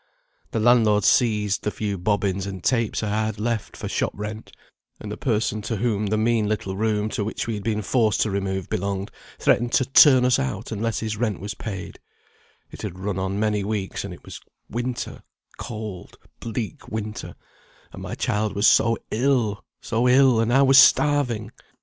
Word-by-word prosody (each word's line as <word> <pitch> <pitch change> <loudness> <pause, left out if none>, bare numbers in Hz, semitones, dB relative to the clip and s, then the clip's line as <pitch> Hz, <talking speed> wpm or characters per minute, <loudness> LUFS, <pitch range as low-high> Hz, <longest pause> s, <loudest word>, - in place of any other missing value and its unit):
The - - -2
landlord 110 -3 +4
seized 105 -4 +2
the - - -1
few 105 -1 -3
bobbins 100 0 -1
and 95 -2 -7
tapes 115 -4 0
I 105 - -1 0.2
had 110 -1 -4
left, 115 0 -3
for - - -5
shop - - -1
rent; 105 +2 -7 0.5
and 105 - -7
the - - -3
person 110 -3 -1
to 110 +2 -3
whom 105 -1 -1
the 110 +2 0
mean 110 -1 +1
little 100 -3 -2
room, 105 0 0
to 105 - -2
which 110 - -3
we 115 - -3
had 105 -2 -5
been 105 0 -1
forced 110 -1 +1
to 110 - +1
remove, 95 -1 -2
belonged, 100 +1 -3 0.3
threatened 120 0 +2
to 130 - +3
turn 130 -1 +6
us 125 -1 +3
out 65 -1 -3
unless 115 +2 -2
his 110 -2 -3
rent 110 -4 -1
was 100 +1 -5
paid; 100 -3 -7 0.7
it - - -10
had 90 - -6
run 95 0 -3
on 95 +1 -2
many 105 -1 0
weeks, 100 -2 -3
and - - -6
it - - -11
was - - -9 0.3
winter, 120 +2 -4 0.4
cold 105 -5 -7 0.2
bleak 115 -1 -5
winter; 110 -1 -5 0.6
and - - -9
my - - -5
child 105 0 -1
was 100 - +1
so 115 +1 +4
ill, 120 -3 +1 0.2
so 120 +2 +1
ill, 130 -2 +5
and 115 +1 +1
I 135 +3 +5
was 135 0 +7
starving. 130 -5 +3
110 Hz, 185 wpm, -23 LUFS, 100-115 Hz, 0.7 s, was